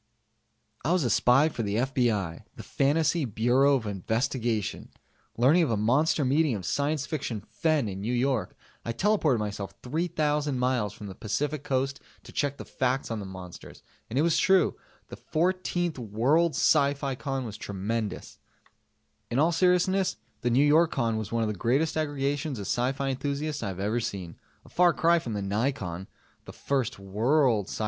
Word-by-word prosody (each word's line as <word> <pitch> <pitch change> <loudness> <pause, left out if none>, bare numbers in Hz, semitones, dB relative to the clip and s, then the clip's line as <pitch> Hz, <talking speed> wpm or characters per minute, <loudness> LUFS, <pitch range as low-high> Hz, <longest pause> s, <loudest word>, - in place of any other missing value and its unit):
I 160 +7 +2
was 180 -4 +2
a 120 - +1
spy 125 +7 +4
for 145 - -4
the 100 -2 -2
FBI 115 -8 0
the - - -9
Fantasy 155 +3 +1
Bureau 125 +4 +3
of 125 -4 -2
Investigation! 110 +2 -2 0.5
Learning 140 +9 +5
of 160 - +1
a 115 - +1
monster 135 +7 +2
meeting 140 0 +2
of 95 -4 -6
science 145 - 0
fiction 135 -8 -3
"fen" 155 -7 0
in 95 -1 -5
New 110 +4 -2
York, 125 -1 0 0.3
I 115 - -3
teleported 165 - +2
myself 105 -2 -4
3,000 150 -1 -1
miles 125 -5 0
from 105 - -10
the 100 - -7
Pacificoast 135 +4 -2 0.2
to - - -12
check 140 -1 -1
the - - -8
facts 130 -1 -1
on 115 - -2
the 100 - -6
monsters. 95 -2 -10 0.3
And 120 - -3
it 145 - +4
was 170 -1 +2
true 190 -2 +3 0.3
the - - -8
14th 175 -1 -1
World 130 +10 +2
SciFi 140 -2 +2
Con 135 -3 -3
was 110 -2 -7
tremonstrous. 105 +2 -4 0.9
In 120 - -2
all 160 +4 +4
seriousness, 180 - +2 0.2
the 120 - +1
Newyorcon 140 -3 +3
was 105 -2 -6
one 115 -1 0
of - - 0
the 105 - -1
greatest 130 - 0
aggregations 145 -2 -1
of 100 - -5
s.f. 125 +6 -1
enthusiasts 140 +2 -2
I 115 - -3
have 95 -1 -5
ever 105 +4 0
seen. 95 -7 -5 0.3
A - - -15
far 175 -1 +4
cry 170 +1 +3
from 120 -8 -5
the 105 - -2
Nycon, 100 -4 -2 0.4
the - - -10
first 130 -4 -2
"world" 110 +3 +1
s.f. - - -6
130 Hz, 170 wpm, -27 LUFS, 110-150 Hz, 0.9 s, Learning